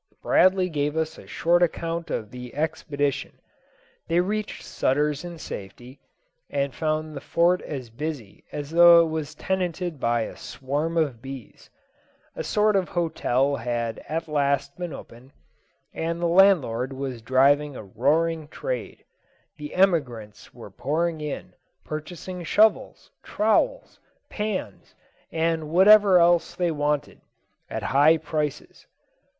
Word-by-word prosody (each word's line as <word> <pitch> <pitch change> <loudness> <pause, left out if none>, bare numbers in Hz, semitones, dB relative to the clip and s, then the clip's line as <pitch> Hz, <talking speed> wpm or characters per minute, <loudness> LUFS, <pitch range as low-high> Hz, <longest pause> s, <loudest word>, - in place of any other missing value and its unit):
Bradley 185 0 +4
gave 150 -2 -2
us 160 0 -2
a - - -14
short 175 +1 +2
account 170 -1 -1
of 110 -1 -4
the 125 -1 -9
expedition. 145 -2 -2 0.7
They 170 - +2
reached 210 +3 -2
Sutter's 145 +3 0
in 175 -1 -7
safety, 125 +1 -9 0.5
and 140 -1 -1
found 155 -1 -2
the 140 - -6
Fort 175 +2 +2
as 130 -6 -7
busy 135 -5 -6
as 145 0 -6
though 170 0 +8
it - - -4
was 155 -1 -4
tenanted 180 -3 -2
by 120 -1 +1
a - - -5
swarm 145 +5 -3
of 140 -8 0
bees. 135 -3 -10 0.7
A - - -4
sort 210 0 +2
of 190 -2 +1
hotel 140 -5 0
had 115 -1 -3
at 165 +1 -3
last 140 -2 0
been 175 -2 -5
opened, 125 0 -12 0.6
and 165 +1 -3
the 175 - -1
landlord 165 -9 +3
was 130 -3 -5
driving 140 +4 +3
a - - -7
roaring 150 - 0
trade. - - -5 0.5
The 150 -1 -8
emigrants 130 - 0
were 115 -4 -12
pouring 155 - -2
in, 150 -2 -6 0.3
purchasing 175 +4 -6
shovels, 215 +6 +2
trowels, - - 0 0.3
pans, 210 - -4 0.4
and 160 -1 -1
whatever 195 +2 +7
else 175 0 +3
they 175 -2 0
wanted, 145 -1 -2 0.5
at - - -4
high 150 +4 +6
prices. 155 -2 -4
155 Hz, 130 wpm, -25 LUFS, 135-170 Hz, 0.7 s, though